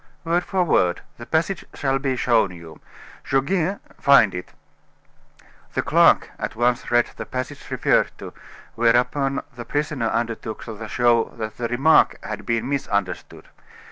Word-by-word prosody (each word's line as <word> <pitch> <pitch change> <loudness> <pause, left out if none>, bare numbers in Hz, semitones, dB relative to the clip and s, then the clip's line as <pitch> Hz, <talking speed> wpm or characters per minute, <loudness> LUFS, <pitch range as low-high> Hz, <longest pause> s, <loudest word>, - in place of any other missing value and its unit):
"Word 170 +2 +1
for 185 0 0
word; 90 - +2 0.2
the 120 - -9
passage 170 +4 0
shall 135 -1 0
be 135 -1 -1
shown 115 -4 +2
you. 85 -3 -12 0.5
Goguet, 170 +7 0 0.2
find 130 -8 +5
it." 90 0 -7 1.2
The - - 0
clerk - - +4
at - - -4
once 120 +1 0
read 120 0 +2
the - - -5
passage 130 -1 -6
referred - - +2
to, - - -9 0.4
whereupon 125 +4 +1
the 120 - -7
prisoner 145 -3 -2
undertook 115 -1 -3
to 110 -1 -7
show 120 0 +3
that 110 -1 -5
the 120 - -2
remark 135 +7 +4
had 105 -1 -6
been 115 +1 0
misunderstood. 100 -9 -3
120 Hz, 140 wpm, -22 LUFS, 110-140 Hz, 1.2 s, find